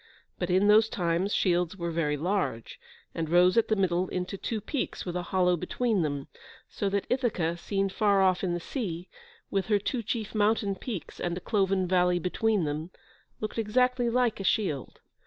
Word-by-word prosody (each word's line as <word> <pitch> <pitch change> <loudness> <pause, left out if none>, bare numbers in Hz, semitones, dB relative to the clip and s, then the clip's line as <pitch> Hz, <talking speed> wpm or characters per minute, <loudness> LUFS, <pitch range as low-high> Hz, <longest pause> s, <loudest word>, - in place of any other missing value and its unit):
But 180 - -2
in 185 +3 +3
those 215 +1 +6
times 175 +2 0
shields 180 -2 +1
were 170 -2 -3
very 150 -3 0
large, 175 - -2 0.3
and 160 -2 -3
rose 180 +2 +5
at 230 - +3
the 220 - +2
middle 185 -2 +1
into 180 +2 -3
two 220 +3 -3
peaks 265 +6 -3
with 175 -1 -4
a 180 - -1
hollow 180 0 +2
between 205 +4 0
them, 145 -3 -2 0.4
so 200 - -2
that 200 0 -1
Ithaca, 215 -10 0
seen 195 +3 -1
far 200 0 +2
off 185 0 +2
in 175 -2 0
the - - -2
sea, 180 - -5 0.4
with 195 -2 0
her 210 - +3
two 235 +5 -2
chief 220 0 -3
mountain 210 -1 +2
peaks, 195 -1 -7
and 175 0 -2
a - - -3
cloven 195 -2 +1
valley 180 -1 +3
between 195 +3 0
them, 155 +2 -3 0.5
looked 215 +1 -3
exactly 250 +2 +2
like 240 -2 +1
a - - -3
shield. 185 - -1
190 Hz, 185 wpm, -28 LUFS, 175-215 Hz, 0.5 s, those